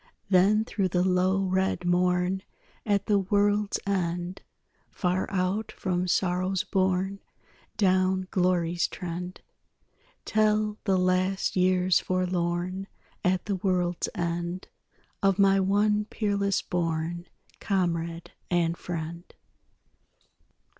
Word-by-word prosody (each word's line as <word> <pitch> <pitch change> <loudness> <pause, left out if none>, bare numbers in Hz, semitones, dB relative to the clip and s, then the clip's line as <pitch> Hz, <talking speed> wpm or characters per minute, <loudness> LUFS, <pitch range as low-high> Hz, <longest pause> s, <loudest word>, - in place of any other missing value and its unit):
Then 200 +4 +4
through 195 -4 -1
the 180 0 +1
low 185 +1 +2
red 190 -1 0
morn 180 +1 +1 0.5
At 200 -1 +1
the 205 -1 +3
world's 205 +1 +1
end, 180 -1 -2 0.5
Far 180 0 -1
out 195 +3 -1
from 180 -1 -1
sorrow's 185 +2 +1
bourne, 190 -1 0 0.6
Down 185 -2 +2
glory's 175 -2 +1
trend, 180 +1 -6 0.8
Tell 215 0 +1
the 190 -3 +3
last 185 +1 +1
years 185 -1 +3
forlorn 180 +1 -1 0.4
At 180 0 +1
the 200 -2 -1
world's 180 -2 0
end, 175 +2 -3 0.5
Of 195 -1 +3
my 195 -1 +5
one 210 +2 +2
peerless 200 -2 0
born 170 -1 -2 0.3
Comrade 170 -3 -1 0.2
and 170 -1 +1
friend. 170 0 -6
185 Hz, 100 wpm, -27 LUFS, 175-195 Hz, 0.8 s, my